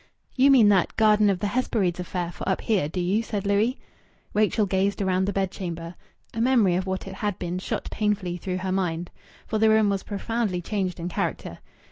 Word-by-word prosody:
"You 270 +1 +5
mean 245 -7 +7
that 190 -4 +2
'Garden 215 -1 +5
of 195 - +1
the - - 0
Hesperides' 205 -7 0
affair 180 -1 -3
for - - -5
up 190 - 0
here, 195 -10 +1
do 180 - -4
you?" 185 +5 +1
said 210 -3 -4
Louis. 210 +6 +2 0.6
Rachel 215 0 +2
gazed 195 +1 0
round 190 -1 +1
the - - +1
bedchamber. 175 -3 -3 0.4
A 225 - -2
memory 235 -7 +4
of 185 +2 -1
what 190 +1 -3
it 190 - -6
had 205 0 -3
been 175 +1 -3
shot - - -4
painfully 205 -5 -1
through 180 +1 -3
her 185 0 -3
mind. 175 -2 -2 0.3
For 220 - -2
the 220 0 +5
room 220 -1 +4
was 195 -1 0
profoundly 210 -2 -2
changed 185 -1 -3
in 170 - -3
character. 180 - -3
195 Hz, 200 wpm, -25 LUFS, 180-215 Hz, 0.6 s, mean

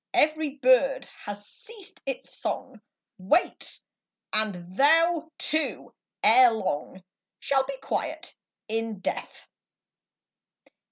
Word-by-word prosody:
Every 305 -2 +2
bird 270 0 +4 0.2
has 205 0 -6
ceased 435 - -9
its 270 -2 -4
song, - - -4 0.4
Wait; 200 - 0 0.5
and 185 -5 0
thou 325 - +4
too, 310 +1 -2 0.3
ere 245 +3 +8
long, 190 -4 -3 0.4
Shall 270 -1 +2
be 275 0 -5
quiet - - -3 0.3
in 225 -1 -2
death. - - -4
260 Hz, 95 wpm, -27 LUFS, 215-310 Hz, 0.5 s, ere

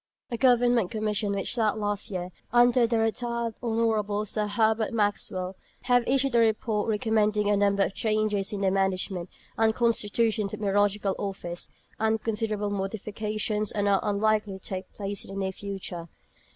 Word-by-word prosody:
A - - 0
Government 245 -4 +4
Commission 215 -1 -1
which 195 -1 -2
sat 220 -3 +1
last 205 0 -1
year, 180 -2 -4 0.2
under 240 0 +5
the 230 0 +1
Rt. 225 0 0 0.4
Hon. 220 -3 0
Sir 210 0 0
Herbert 220 +1 +1
Maxwell, 200 -3 -1 0.3
Bart., 245 -1 +4
have - - -12
issued 270 0 +2
a 235 - +5
Report, 220 -1 +1
recommending 215 -1 +1
a - - +4
number 200 0 +3
of 195 - -2
changes 215 -2 0
in 205 -2 -4
the 190 -1 +2
management 190 -2 -1 0.3
and 220 0 +3
constitution 225 -2 +1
of - - -3
the - - -3
Meteorological 205 -1 +1
Office; 185 -3 -5 0.3
and 220 0 +2
considerable 210 -2 -1
modifications 210 +1 -2
are 205 -2 0
not 200 -1 +3
unlikely 210 -1 +1
to 190 - -18
take 185 -1 -5
place 200 -1 -4
in 195 - -9
the - - -3
near 190 -1 -1
future. 190 -3 -6
210 Hz, 165 wpm, -27 LUFS, 200-225 Hz, 0.4 s, under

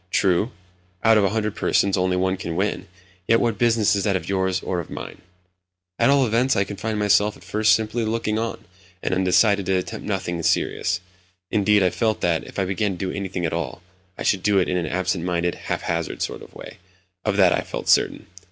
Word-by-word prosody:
True, 95 +3 +2 0.5
out 110 -1 +6
of - - +2
a 100 - +3
hundred 105 0 -2
persons, 100 -1 +2
only 90 -1 +1
one 95 +1 +1
can 85 -3 -5
win; 100 +4 -1 0.4
yet 115 - +4
what 110 -3 0
business 115 -4 +3
is 100 - -1
that 100 -2 +1
of 95 - -3
yours 95 -1 0
or 90 - -2
of 85 - -7
mine? - - -8 0.8
At - - +4
all 140 -1 +4
events, 120 +3 +2
I 100 - +3
confined 105 +2 -4
myself 105 0 +2
at - - -18
first 110 +1 +3
simply 110 +1 0
to 110 - -1
looking 110 -1 -1
on, 115 0 -4 0.4
and 95 +1 0
decided 100 +1 +3
to 95 - +2
attempt 90 - -5
nothing 95 -4 -2
serious. - - 0 0.5
Indeed, 105 -1 +3
I 90 - +2
felt 110 -2 0
that, 85 -2 +1
if - - -11
I 95 - +1
began 95 +2 -1
to - - -8
do 95 +1 -3
anything 95 -3 -3
at 80 - -2
all, 85 +1 -4 0.3
I - - -5
should 95 - +1
do 105 +1 +2
it 95 - +3
in 90 - -1
an 90 -2 -1
absent 90 -1 -1
minded, 85 -1 0
haphazard 85 -1 -3
sort - - -4
of - - -14
way—of 90 +2 -7
that 95 -3 +5
I - - 0
felt - - -6
certain. - - +3
95 Hz, 215 wpm, -23 LUFS, 90-105 Hz, 0.8 s, out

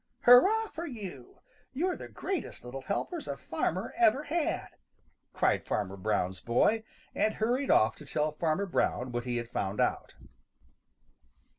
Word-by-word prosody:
"Hurrah 405 - +6
for 335 +2 -6
you! 195 - -9 0.3
You're 355 +7 0
the - - -8
greatest 380 - -4
little 130 +2 -6
helpers 315 - -3
a - - -3
farmer - - -2
ever 330 -5 +4
had!" 315 +2 -1 0.6
cried - - +1
Farmer 100 -2 -2
Brown's 95 -2 -1
boy, 210 - +2 0.3
and 215 - +1
hurried 245 +5 0
off 110 - +4
to 150 - -12
tell 150 +1 0
Farmer 160 +5 0
Brown 130 -8 0
what 120 0 -3
he 120 -1 -1
had 120 -1 -3
found 100 -4 -3
out. - - 0
185 Hz, 145 wpm, -30 LUFS, -, 0.6 s, Hurrah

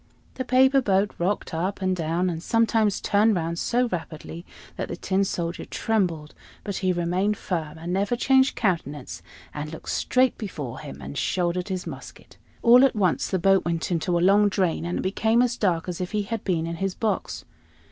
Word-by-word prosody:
The 260 - -4
paper 265 +2 +4
boat 200 -2 +2
rocked 185 +1 -1
up 180 +5 -2
and 185 -1 0
down, 170 +2 -1
and 165 -2 -3
sometimes 225 -1 +2
turned 210 +1 +3
round 170 0 -2
so 245 +1 +1
rapidly 165 -1 -6 0.3
that - - -4
the - - -5
Tin 195 +1 0
Soldier 170 -3 -3
trembled; 175 -9 -1 0.3
but 200 -2 -4
he 185 -1 +1
remained 180 +4 0
firm, 160 -4 -4
and 170 +2 -4
never 200 +5 +1
changed 265 +2 +3
countenance, 145 - -2 0.3
and 150 0 -5
looked 160 - -9
straight 255 0 +1
before 145 - -6
him, 150 - -9
and 140 - -5
shouldered 175 +6 -1
his 185 -1 -3
musket. - - -10 0.3
All 245 +2 +7
at 270 - +3
once 185 -5 +1
the 190 - 0
boat 195 +2 +3
went 170 +1 -2
into 175 +1 0
a - - 0
long 205 +2 +5
drain, 185 -4 0
and 175 - -2
it - - -1
became 220 +5 +2
as 245 -1 0
dark 180 -7 0
as 180 0 -4
if 180 +3 -4
he 210 -1 0
had 225 +1 -4
been 170 -4 0
in 165 0 -4
his 195 +1 -2
box. 220 -2 -2
185 Hz, 195 wpm, -25 LUFS, 170-210 Hz, 0.3 s, All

